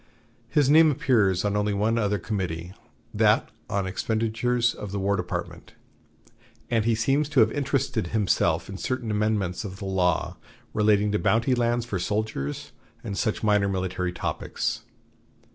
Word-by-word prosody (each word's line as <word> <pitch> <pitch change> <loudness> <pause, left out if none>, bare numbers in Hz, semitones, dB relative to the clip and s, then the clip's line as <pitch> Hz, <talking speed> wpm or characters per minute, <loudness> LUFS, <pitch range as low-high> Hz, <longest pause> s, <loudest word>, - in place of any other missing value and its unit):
His 145 -3 +3
name 155 +2 +7
appears 110 -10 +2
on 105 0 0
only 105 0 0
one 110 +3 +1
other 105 -1 +1
committee, 90 -3 -4 0.4
that - - +3 0.2
on 100 -1 -1
Expenditures 115 +4 0
of 105 - -7
the 100 - -3
War 100 +1 +1
Department, - - -5 1.0
and 115 -2 +2
he 115 -1 +3
seems 135 +6 +1
to 145 - +2
have 110 0 +4
interested 140 -9 -1
himself 105 0 +1
in 95 - -7
certain 125 -4 -2
amendments 105 -3 0
of 95 -2 -7
the 100 - -7
law 90 -2 0 0.4
relating 105 -1 +3
to 105 - +1
bounty 115 +3 +2
lands 120 -1 +1
for 105 -6 -3
soldiers 105 -8 -3 0.3
and 100 - -4
such 110 +1 -1
minor 105 -2 +3
military 90 -1 -2
topics. - - -3
105 Hz, 150 wpm, -25 LUFS, 95-115 Hz, 1.0 s, name